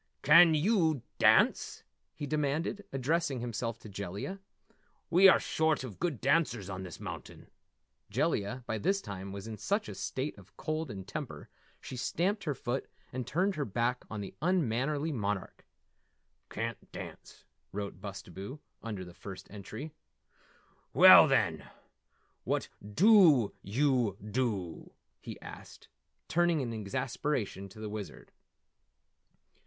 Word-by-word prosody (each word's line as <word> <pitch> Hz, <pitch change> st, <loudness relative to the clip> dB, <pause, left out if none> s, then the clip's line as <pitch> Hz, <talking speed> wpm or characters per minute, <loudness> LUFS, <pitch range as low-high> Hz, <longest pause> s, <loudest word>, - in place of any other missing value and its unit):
"Can 165 Hz, -3 st, +8 dB
yew 160 Hz, -, +2 dB, 0.2 s
dance?" -, -, +4 dB, 0.3 s
he 150 Hz, -, -4 dB
demanded, 155 Hz, +7 st, -1 dB
addressing 135 Hz, +1 st, 0 dB
himself 115 Hz, -1 st, -3 dB
to -, -, -10 dB
Jellia. 100 Hz, -, -5 dB, 0.7 s
"We 190 Hz, +3 st, +8 dB
are -, -, +6 dB
short 160 Hz, -3 st, +1 dB
of 120 Hz, -7 st, -8 dB
good 165 Hz, -9 st, -1 dB
dancers 130 Hz, -, +1 dB
on 95 Hz, -1 st, -5 dB
this 90 Hz, -4 st, -8 dB
mountain." -, -, -8 dB, 0.6 s
Jellia 125 Hz, +6 st, -1 dB
by 110 Hz, -2 st, -2 dB
this 195 Hz, -, +1 dB
time 100 Hz, -, -7 dB
was 100 Hz, 0 st, -7 dB
in 110 Hz, -1 st, -6 dB
such 205 Hz, -, -1 dB
a -, -, -6 dB
state 135 Hz, +3 st, -3 dB
of 95 Hz, 0 st, -19 dB
cold 155 Hz, -1 st, -2 dB
and 95 Hz, -4 st, -7 dB
temper, 145 Hz, +2 st, -6 dB, 0.3 s
she -, -, -8 dB
stamped 185 Hz, -, -1 dB
her 145 Hz, -3 st, -1 dB
foot 125 Hz, +2 st, -3 dB, 0.3 s
and 125 Hz, -2 st, -4 dB
turned 190 Hz, +5 st, +1 dB
her 150 Hz, -, -2 dB
back 120 Hz, +2 st, -1 dB
on 105 Hz, -2 st, -4 dB
the 100 Hz, -, -7 dB
unmannerly 150 Hz, -2 st, +1 dB
monarch. 105 Hz, -7 st, -3 dB, 0.8 s
"Can't 115 Hz, 0 st, -5 dB
dance," -, -, -10 dB, 0.3 s
wrote 100 Hz, -2 st, -5 dB
Bustabo 100 Hz, -, -7 dB, 0.2 s
under 105 Hz, -5 st, -5 dB
the 90 Hz, -, -12 dB
first 95 Hz, +1 st, -10 dB
entry. 110 Hz, +9 st, -7 dB, 1.0 s
"Well, -, -, +10 dB
then -, -, +1 dB, 0.7 s
what -, -, -1 dB
dew 150 Hz, -, +5 dB
yew 120 Hz, -2 st, +1 dB
dew?" 105 Hz, -6 st, -3 dB, 0.3 s
he -, -, -8 dB
asked, -, -, -11 dB, 0.4 s
turning 170 Hz, -1 st, +2 dB
in 120 Hz, -4 st, -2 dB
exasperation 105 Hz, 0 st, -2 dB
to 105 Hz, -, -13 dB
the 110 Hz, -, -5 dB
Wizard. 105 Hz, -2 st, -7 dB
125 Hz, 130 wpm, -31 LUFS, 100-155 Hz, 1.0 s, Well